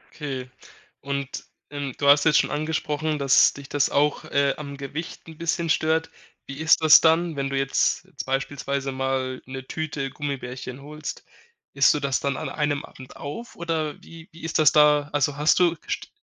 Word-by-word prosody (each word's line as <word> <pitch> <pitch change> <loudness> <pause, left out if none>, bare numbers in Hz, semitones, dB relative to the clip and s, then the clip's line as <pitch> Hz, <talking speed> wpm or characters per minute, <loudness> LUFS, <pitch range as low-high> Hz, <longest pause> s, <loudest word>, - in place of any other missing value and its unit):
Okay. 135 -4 -5 0.5
Und, 140 -1 -4 0.3
ähm, 145 -2 -4
du 140 - 0
hast 145 0 +7
jetzt 155 -1 +5
schon - - 0
angesprochen, 155 0 -1
dass 140 -2 +5
dich 140 -1 -10
das 145 -1 +1
auch, 145 +1 +1
äh, 140 -1 +1
am 140 -2 -7
Gewicht 140 +6 -7
'n 160 -1 -11
bisschen 170 0 -1
stört. 160 +2 +1 0.3
Wie 140 - -8
ist 160 0 +4
das 155 -1 +9
dann, 165 0 +3
wenn 135 -1 -2
du 135 - -2
jetzt 135 0 +1
jetzt - - -8
beispielsweise 140 0 -2
mal 130 -1 -2
'ne 130 0 -7
Tüte 145 -4 -4
Gummibärchen 130 -2 -6
holst? 150 +1 -7 0.5
Isst 140 -1 +5
du - - -1
das 140 -2 0
dann 140 -1 -2
an - - -4
einem 145 -1 -1
Abend 130 -1 -14
auf 230 +12 -8
oder 160 -3 -3
wie 165 0 -13
wie 165 - -15
ist 160 0 -1
das 155 -3 +6
da? 150 -1 +4
Also, 145 -1 +1
hast 150 +2 +3
du 175 -2 +3
gest - - -6
145 Hz, 185 wpm, -24 LUFS, 135-155 Hz, 0.5 s, das